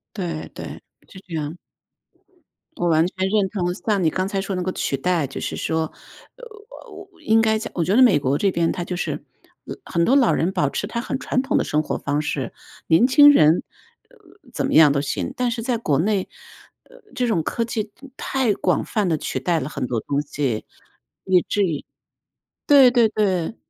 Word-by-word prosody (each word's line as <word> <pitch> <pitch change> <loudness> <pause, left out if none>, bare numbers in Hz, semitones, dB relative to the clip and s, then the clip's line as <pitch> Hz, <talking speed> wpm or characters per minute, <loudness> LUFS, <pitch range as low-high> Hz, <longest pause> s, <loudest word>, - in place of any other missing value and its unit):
对 170 -5 -4
对， - - -9 0.3
是 190 - -13
这 170 - -8
样。 155 +2 -4 1.2
我 175 - 0
完 160 0 +4
全 190 +1 -2
认 200 -2 +1
同 180 -3 -2
像 205 -2 -1
你 - - +4
刚 185 +3 -2
才 195 -1 -2
说 195 0 -4
那 180 - -2
个 185 - -2
取 135 - -2
代， 170 0 0
就 135 - -7
是 - - -4
说， 160 -1 -2 0.4
呃， - - -12 0.7
我 - - -24
应 225 +1 +3
该 220 -1 +2
讲 220 - -7
我 170 - -1
觉 190 - +1
得 - - +6
美 235 -12 +6
国 140 +1 0
这 195 -2 +1
边 170 -1 +1
它 175 - -3
就 180 - -5
是， - - -4 0.4
老 - - -7
很 170 -1 0
多 260 - +3
老 270 -4 +4
人 180 +4 0
保 145 -5 0
持 - - -3
他 235 +2 -4
很 265 +2 -4
传 255 0 -1
统 - - 0
的 - - 0
生 150 +1 0
活 - - -3
方 145 +1 -1
式， 135 -4 -3 0.3
年 170 +10 +5
轻 290 +2 +8
人， 155 - +4 0.4
呃， - - -23 0.4
怎 - - -2
么 - - -2
样 155 -3 +7
都 140 - 0
行， 140 - -3
但 250 -1 0
是 235 -1 -3
在 245 0 0
国 150 -11 0
内， 195 +2 0 0.6
呃， - - -19 0.2
这 250 -1 0
种 195 -8 +1
科 230 +8 -2
技 220 -2 -4 0.3
太 255 -6 0
广 180 -4 0
泛 210 -4 -1
地 160 - +1
取 - - -4
代 175 -2 0
了 135 -1 -4
很 135 - -4
多 120 -2 -2
东 145 +5 -2
西， 140 -6 -3 0.6
以 185 -2 +3
至 205 - +1
于 160 -6 -3 0.8
对 275 -4 +7
对 235 -3 +4
对。 195 -2 -1
185 Hz, 225 characters per minute, -22 LUFS, 160-225 Hz, 1.2 s, 轻